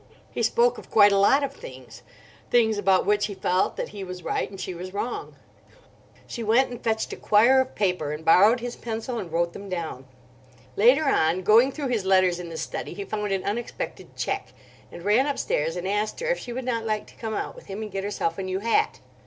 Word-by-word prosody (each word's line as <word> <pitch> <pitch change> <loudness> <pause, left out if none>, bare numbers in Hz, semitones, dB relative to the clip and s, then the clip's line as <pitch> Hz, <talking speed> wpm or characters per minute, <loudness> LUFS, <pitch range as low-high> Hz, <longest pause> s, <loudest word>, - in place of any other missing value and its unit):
He - - -3
spoke 475 0 +2
of - - -14
quite 205 -2 +6
a 200 - +3
lot 270 +8 +4
of 275 -1 -2
things—things 240 - -3
about 190 -2 +3
which 205 0 +2
he 200 - -7
felt 185 0 0
that - - -3
he 200 -1 -7
was 180 -1 -8
right - - -2
and 195 -1 -11
she 185 - -4
was 185 +2 -8
wrong. 235 +4 -4 0.9
She 240 - -6
went 230 +4 +3
and 245 - -8
fetched 220 -1 -1
a - - -4
quire 240 +6 +4
of 260 - -5
paper, 180 -7 0
and 150 +1 -6
borrowed 205 +9 +6
his 245 0 -5
pencil 230 +1 -4
and 175 -6 -7
wrote 170 +1 0
them 200 0 -9
down. 160 -7 -5 0.7
Later 255 +9 +5
on, 175 - +2
going 225 +7 +5
through 280 -2 -4
his 230 -5 0
letters 185 -2 +3
in 175 -1 -7
the 165 - -7
study, - - -5
he 200 - -5
found 210 0 -3
an 195 -1 -1
unexpected 230 +4 -5
cheque; - - -3 0.4
and 170 - -10
ran 225 +7 +3
upstairs 165 - -1
and 180 +1 -4
asked 210 +2 -1
her 485 0 -2
if - - -1
she 245 - -7
would 250 +1 -5
not 230 -3 -1
like 215 -1 -2
to - - -18
come 220 -2 -4
out - - -4
with - - -14
him 200 +3 -5
and 210 - -7
get 195 0 -3
herself 195 -4 -2
a - - -1
new 185 0 -2
hat. 230 - 0
205 Hz, 225 wpm, -25 LUFS, 185-240 Hz, 0.9 s, quite